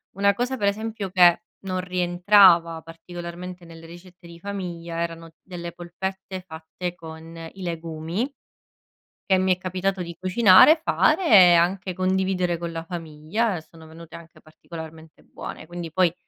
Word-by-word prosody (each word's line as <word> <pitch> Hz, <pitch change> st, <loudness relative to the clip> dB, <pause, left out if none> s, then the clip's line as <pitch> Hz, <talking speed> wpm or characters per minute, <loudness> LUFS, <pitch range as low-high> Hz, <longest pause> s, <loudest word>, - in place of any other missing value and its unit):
Una 200 Hz, +1 st, +3 dB
cosa 250 Hz, +4 st, -2 dB
per 205 Hz, -, 0 dB
esempio 215 Hz, -1 st, -3 dB
che 175 Hz, -2 st, +5 dB, 0.2 s
non 185 Hz, -1 st, -2 dB
rientrava 180 Hz, -2 st, +4 dB
particolarmente 175 Hz, +2 st, -9 dB
nelle 165 Hz, -1 st, -13 dB
ricette 175 Hz, +1 st, -14 dB
di 170 Hz, 0 st, -13 dB
famiglia 170 Hz, -4 st, -6 dB
erano 165 Hz, -1 st, -5 dB
delle 175 Hz, -2 st, -8 dB
polpette 190 Hz, +2 st, -6 dB
fatte 175 Hz, +1 st, -7 dB
con 160 Hz, 0 st, -11 dB, 0.2 s
i 190 Hz, -, -12 dB
legumi 165 Hz, -, -4 dB, 1.0 s
che 190 Hz, -, +5 dB
mi 185 Hz, 0 st, +2 dB
è -, -, -23 dB
capitato 185 Hz, +1 st, -2 dB
di 170 Hz, -1 st, -8 dB
cucinare, 190 Hz, -, +6 dB
fare 335 Hz, +5 st, +2 dB
e 185 Hz, -4 st, +8 dB
anche 180 Hz, +2 st, +1 dB
condividere 185 Hz, -2 st, 0 dB
con 170 Hz, -1 st, -5 dB
la 165 Hz, 0 st, -5 dB
famiglia 165 Hz, +5 st, -3 dB
e 160 Hz, -, -7 dB
sono 160 Hz, -1 st, -16 dB
venute 165 Hz, 0 st, -13 dB
anche 170 Hz, -1 st, -14 dB
particolarmente 160 Hz, 0 st, -12 dB
buone, -, -, -9 dB
quindi 175 Hz, 0 st, -7 dB
poi 175 Hz, 0 st, +2 dB
175 Hz, 145 wpm, -24 LUFS, 165-190 Hz, 1.0 s, e